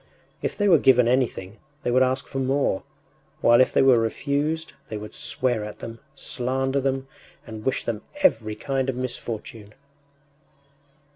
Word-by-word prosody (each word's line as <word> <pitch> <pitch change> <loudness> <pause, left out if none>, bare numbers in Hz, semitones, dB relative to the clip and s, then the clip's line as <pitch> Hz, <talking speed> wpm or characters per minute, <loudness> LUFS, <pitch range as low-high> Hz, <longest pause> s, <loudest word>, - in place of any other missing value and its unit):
If - - -3
they 205 - +2
were 170 -6 +6
given 125 -3 +5
anything, 115 -5 0 0.2
they 120 - 0
would 130 +1 +4
ask 130 0 +1
for 135 - -5
more; 135 -6 +1 0.6
while 120 +1 +6
if 130 - +3
they - - +4
were 130 -3 +6
refused, 145 +7 -1 0.2
they 110 - -4
would 105 0 -8
swear 120 -4 -1
at 105 0 -7
them, 115 0 -8 0.2
slander 135 +2 -1
them, 135 0 -1 0.4
and 110 -2 -8
wish 130 - 0
them 110 -2 -3 0.2
every 110 - +3
kind 135 +1 -1
of 130 - -1
misfortune. 115 -4 -6
130 Hz, 155 wpm, -24 LUFS, 115-135 Hz, 0.6 s, were